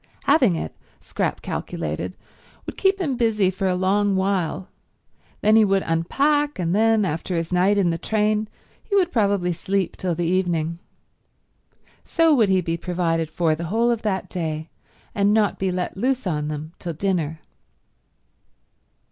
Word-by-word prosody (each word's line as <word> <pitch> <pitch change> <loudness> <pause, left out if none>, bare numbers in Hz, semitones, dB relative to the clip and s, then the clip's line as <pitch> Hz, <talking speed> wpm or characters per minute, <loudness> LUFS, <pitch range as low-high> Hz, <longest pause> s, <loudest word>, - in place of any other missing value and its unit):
Having 250 - +4
it, - - -5 0.2
Scrap - - -3
calculated, - - -4 0.5
would - - -6
keep 390 0 +2
him 285 -9 -1
busy 215 -5 +2
for 190 +1 -2
a 185 - +1
long 195 +2 +2
while. 190 -2 -1 0.7
Then 215 +1 +4
he 220 - +7
would 195 -1 +2
unpack, 285 - +1
and 175 -2 -1
then, 220 -1 +3
after 170 +2 -3
his 165 +2 -3
night 190 +3 +3
in 185 -4 +2
the 165 - -3
train, 215 0 0 0.4
he 405 - -2
would 365 -3 +3
probably 200 -5 +1
sleep 190 +1 -2
till 180 -3 -2
the 175 +1 -1
evening. 170 -2 0 1.2
So 330 -2 +3
would 225 -8 +3
he 190 -1 +3
be 165 -1 -2
provided 165 -2 -1
for 165 -2 +1
the 165 +2 -4
whole 230 +7 +1
of 230 -2 -1
that 195 -3 -2
day, 160 -2 -4 0.4
and 205 +1 +2
not 215 -2 +1
be 190 -1 0
let 180 0 -3
loose 255 +5 -1
on 150 -4 -1
them 155 +2 -5
till 170 - -4
dinner. 160 -3 -2
190 Hz, 160 wpm, -23 LUFS, 170-215 Hz, 1.2 s, he